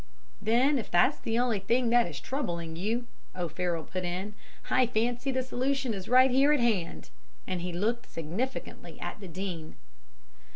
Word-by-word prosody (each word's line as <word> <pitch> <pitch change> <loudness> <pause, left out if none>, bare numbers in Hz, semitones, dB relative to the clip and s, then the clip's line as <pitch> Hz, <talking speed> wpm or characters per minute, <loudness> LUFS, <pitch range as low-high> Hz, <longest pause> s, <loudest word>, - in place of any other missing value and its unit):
"'Then, 255 +6 +3
if 220 - -6
that's 175 +12 +4
the 225 0 -1
only 240 -4 +2
thing 235 +5 +1
that 240 -3 +5
is 150 -5 -6
troubling 170 - -3
you,' 220 +8 -1 0.3
O'Farroll 175 -1 -2
put 185 +3 -4
in, 185 +4 -3 0.4
'I 255 -1 +4
fancy 240 +3 0
the 260 0 0
solution 260 0 0
is 190 -2 -6
right 255 +1 +6
here 275 +3 +5
at 300 - +4
hand,' 215 -8 0 0.3
and 185 -2 -3
he 180 +1 -3
looked 225 +7 -1
significantly 180 - -4
at - - -5
the 195 - -8
Dean. 175 -2 -5
220 Hz, 165 wpm, -29 LUFS, 180-250 Hz, 0.4 s, right